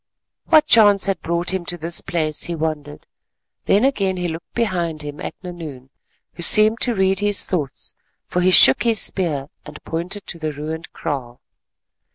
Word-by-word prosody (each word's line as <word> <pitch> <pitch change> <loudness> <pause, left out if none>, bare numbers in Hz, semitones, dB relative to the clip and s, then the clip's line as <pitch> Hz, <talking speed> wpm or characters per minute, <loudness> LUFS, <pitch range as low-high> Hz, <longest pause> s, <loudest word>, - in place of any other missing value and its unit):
What 310 -2 +5
chance 205 -3 +5
had 195 -3 -2
brought 170 +2 -2
him 190 -2 -2
to 175 - -3
this 170 +1 -2
place, 155 -3 -1
he 170 - -3
wondered; 150 -2 -4 0.6
then 205 +6 +3
again 195 -9 0
he 180 0 -2
looked 165 0 -8
behind 175 -9 -2
him 145 0 -8
at - - -6
Nahoon, 155 -8 -9 0.4
who - - -10
seemed 215 +5 +3
to 240 -2 +2
read 190 -1 +1
his 205 0 0
thoughts, 150 -8 -4 0.3
for 180 - -2
he 180 - +3
shook 135 -7 +7
his 230 -3 +2
spear 150 -7 0
and 150 0 -11
pointed 175 +5 -4
to 170 - -6
the 155 -1 -3
ruined 155 +3 -6
kraal. 130 -6 -5
175 Hz, 175 wpm, -20 LUFS, 155-195 Hz, 0.6 s, shook